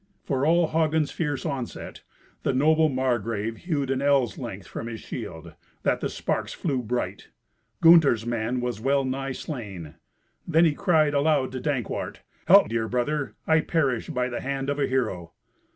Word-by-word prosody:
For 140 -1 0
all 170 0 +3
Hagen's 160 -1 +1
fierce 150 -3 -3
onset, 135 -6 -5 0.4
the - - 0
noble 155 +3 +4
Margrave 115 -4 -1
hewed 145 -6 -2
an 135 0 0
ell's 140 -6 +2
length - - -6
from 115 - -6
his 115 -1 -6
shield, 80 0 -7 0.3
that - - +1
the - - -2
sparks - - -2
flew 135 -6 -1
bright. 120 +1 -3 0.5
Gunther's 160 -9 +6
man 120 +1 -1
was 120 -3 -3
well 135 +2 +2
nigh 135 +1 -3
slain. 100 - -7 0.5
Then 165 0 +4
he 155 - +3
cried 155 -3 +2
aloud 145 -2 +2
to 130 - -4
Dankwart, 135 -5 -3 0.3
"Help! - - +7
dear 115 0 -1
brother. 125 0 -1
I 160 0 +4
perish 140 -8 0
by 125 0 -1
the 120 - -4
hand 135 0 -2
of 145 - -3
a 140 - +2
hero." 110 -10 -2
135 Hz, 165 wpm, -25 LUFS, 120-150 Hz, 0.5 s, Help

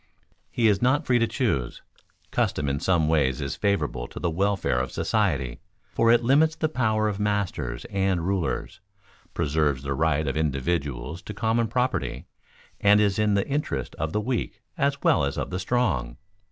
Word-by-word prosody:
He 115 -2 +2
is 105 -2 +2
not 130 +4 +2
free 125 -1 +3
to 115 - +2
choose. 110 - -2 0.5
Custom 70 - 0
in 70 0 -1
some 85 -3 +2
ways 70 -5 +2
is 70 -1 -3
favorable 100 - -1
to - - -9
the 85 - -1
welfare 95 -6 0
of 65 - -3
society, 80 - 0 0.3
for 115 0 +4
it 120 0 +4
limits 150 +6 +4
the 155 - -1
power 110 -6 +1
of 105 -1 -2
masters 100 -12 -2
and 95 -3 0
rulers, 95 -3 -2 0.6
preserves 75 -3 0
the 70 0 -2
rights 80 0 +1
of 70 - -1
individuals 70 -1 -2
to 105 - -8
common 115 +1 +1
property, 125 +3 -1 0.5
and 105 +1 +5
is 100 -1 +2
in 105 -1 +2
the 100 - 0
interest 135 - -2
of 80 0 -1
the 105 - 0
weak 125 +2 -3
as 140 -4 0
well 85 - +4
as 70 0 -2
of - - -3
the 90 - -2
strong. 90 - 0
95 Hz, 175 wpm, -25 LUFS, 70-115 Hz, 0.6 s, and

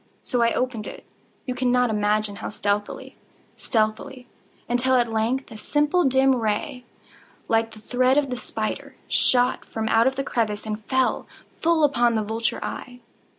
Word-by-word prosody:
So 245 -2 -1
I 230 0 +3
opened 250 -4 -2
it—you 255 - -10
cannot 250 -1 +2
imagine 210 -1 0
how - - -5
stealthily, 205 0 -3 0.4
stealthily—until, 245 +2 -2
at 240 -2 +2
length 235 +5 -1
a 220 - -8
simple 295 +8 +1
dim 265 0 +4
ray, 230 +1 -2 0.6
like 225 0 +2
the 220 -1 -14
thread 255 +4 +2
of 280 -3 +1
the - - -1
spider, 220 -3 -4
shot 250 0 +3
from 220 -1 -4
out 235 +4 +3
the 275 - -2
crevice 215 -5 -1
and 215 0 -4
fell 260 -1 0 0.3
full 330 -1 +2
upon 240 -5 +3
the 220 - +1
vulture 225 +2 -2
eye. 245 -1 -7
240 Hz, 150 wpm, -24 LUFS, 220-260 Hz, 0.6 s, dim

